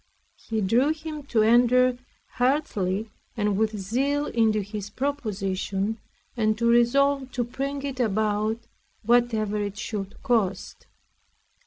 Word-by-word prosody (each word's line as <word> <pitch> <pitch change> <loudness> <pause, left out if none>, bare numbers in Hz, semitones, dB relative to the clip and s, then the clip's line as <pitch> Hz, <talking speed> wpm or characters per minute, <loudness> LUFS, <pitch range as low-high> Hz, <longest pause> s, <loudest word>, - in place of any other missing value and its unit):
He 220 -1 0
drew 235 +9 +3
him 310 -1 -7
to 220 -5 +2
enter 245 +2 +4 0.4
heartily 220 -7 0 0.3
and 210 -2 +1
with 215 +1 0
zeal 270 +9 0
into 220 -4 +1
this 205 0 -6
proposition, 205 -5 -2 0.4
and 215 -2 +1
to 235 - -1
resolve 265 +3 +3
to 245 - 0
bring 275 +4 -4
it 275 -2 -4
about 215 0 0 0.4
whatever 225 -2 +2
it 205 -1 -3
should 205 -2 -5
cost. 215 -7 -1
225 Hz, 120 wpm, -25 LUFS, 210-255 Hz, 0.4 s, enter